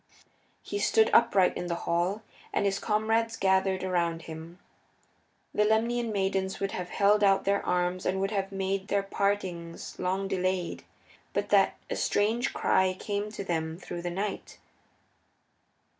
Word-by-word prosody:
He 405 - -4
stood 440 +1 +3
upright 195 -5 +5
in 175 - -4
the 170 - -1
hall, 180 +6 0 0.3
and - - 0
his 195 0 +1
comrades 225 +2 +1
gathered 190 -1 +2
around 170 -3 0
him. 160 +2 -9 1.0
The 210 - +3
Lemnian 230 +2 +1
maidens 190 -1 -1
would 195 0 -1
have 180 -1 -4
held 205 +2 +3
out 195 -1 +4
their 200 +1 +1
arms 180 0 0
and 190 +1 0
would 195 +1 -1
have 195 -2 -1
made 195 0 -2
their 200 -1 +1
partings 190 -4 -2
long 190 +2 -1
delayed, 185 -2 -1 0.5
but - - -1
that - - +4
a - - -3
strange 225 +5 +1
cry 185 0 +2
came 205 0 -3
to 205 - -5
them 160 -3 -2
through 175 -1 -6
the 175 - -3
night. 195 +3 -4
195 Hz, 150 wpm, -28 LUFS, 180-205 Hz, 1.0 s, upright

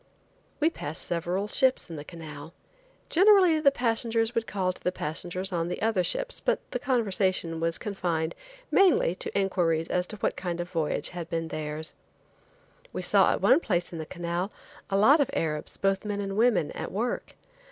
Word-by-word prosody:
We 315 +2 +3
passed 155 - -3
several 175 +4 -1
ships 260 +4 +2
in 165 - -7
the 145 - -6
canal. 155 -2 -10 0.5
Generally 370 -3 +5
the 295 -2 +6
passengers 230 -3 0
would 230 -1 -1
call 185 -2 -1
to - - -15
the 180 - +1
passengers 180 +3 -4
on 170 -2 -1
the 175 - -4
other 215 -4 +1
ships, - - -2
but - - +1
the - - -2
conversation 190 -9 0
was 165 0 0
confined 175 -6 -2 0.4
mainly 370 - +4
to 190 - -3
inquiries 170 -4 +1
as 180 0 0
to 215 - -5
what 205 - -1
kind 175 -2 -4
of 175 0 -4
a - - -23
voyage 155 -3 -1
had 175 -2 -6
been 165 -1 -2
theirs. 155 +1 -5 1.0
We - - -4
saw - - +4
at - - -1
one - - +6
place 180 - -1
in 165 - -5
the 155 - -5
canal, 175 +3 -3 0.4
a 195 - +1
lot 265 +10 +6
of 285 - +2
Arabs, 150 -2 -2
both 195 0 +1
men 205 -1 -3
and 195 -1 -3
women, 220 -8 +3
at - - -5
work. 230 +5 -3
185 Hz, 185 wpm, -27 LUFS, 165-225 Hz, 1.0 s, the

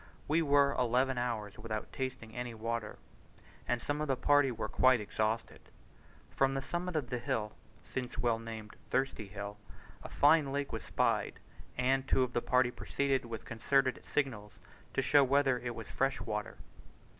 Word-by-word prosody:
We 160 +3 +3
were 140 -2 +4
eleven 125 +1 +2
hours 110 -4 -3
without 110 -1 -5
tasting 130 -4 -5
any 120 -1 -4
water, 115 -1 -3 0.7
and 120 - +1
some 145 +4 -2
of 155 - -1
the 135 - +2
party 145 +1 +4
were 120 - -3
quite 130 -2 +4
exhausted. 110 +2 -2 0.7
From 135 0 +2
the 135 - -1
summit 175 +2 -3
of 130 -5 -2
a 125 - 0
hill 110 -2 -1 0.3
(since 125 -1 -5
well 115 -2 +1
named 110 -2 -8
Thirsty 130 -5 0
Hill) 100 +1 -6 0.4
a - - -8
fine 150 -1 +4
lake 140 0 -2
was - - -3
spied, - - 0 0.4
and 130 +1 +2
two 130 - +3
of 125 -1 -3
the 120 - +1
party 125 0 +3
proceeded 135 0 -1
with 115 -2 -6
concerted 130 +3 +1
signals 110 -8 -1 0.4
to - - +2
show 140 +3 +6
whether 135 -1 +3
it 120 -1 -4
was 115 - -7
fresh 135 0 0
water. 105 -1 -4
125 Hz, 165 wpm, -33 LUFS, 115-135 Hz, 0.7 s, show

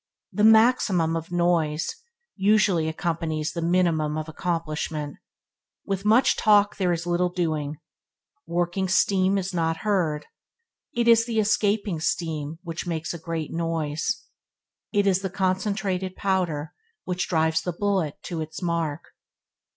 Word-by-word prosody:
The 210 - 0
maximum 220 -7 +4
of 165 +1 -5
noise 170 -3 +1 0.5
usually 195 -5 +3
accompanies 160 -1 -2
the 170 - -3
minimum 165 -3 +1
of 155 0 -4
accomplishment. 160 -3 -3 0.7
With 195 0 -3
much 225 +5 +5
talk 205 -2 +4
there 185 -3 +1
is 170 0 -2
little 175 +1 +1
doing. 155 -4 -2 0.7
Working 175 +2 0
steam 190 +1 +3
is 190 -1 -3
not 165 -1 0
heard. 165 -8 0 0.7
It 235 0 +1
is 230 0 +5
the 225 -2 0
escaping 205 -3 +1
steam 160 -1 -2
which 170 0 -5
makes 165 -1 -3
a 170 - -7
great 165 -1 -4
noise. 165 +7 -2 0.7
It 205 -1 +2
is 190 -1 +3
the 190 - -2
concentrated 190 0 -1
powder 175 -6 -1 0.3
which 180 -1 -2
drives 160 -1 +2
the 180 - -2
bullet 185 -4 -1
to 165 -2 -4
its 160 0 -6
mark. 170 -3 -2
175 Hz, 135 wpm, -25 LUFS, 160-195 Hz, 0.7 s, much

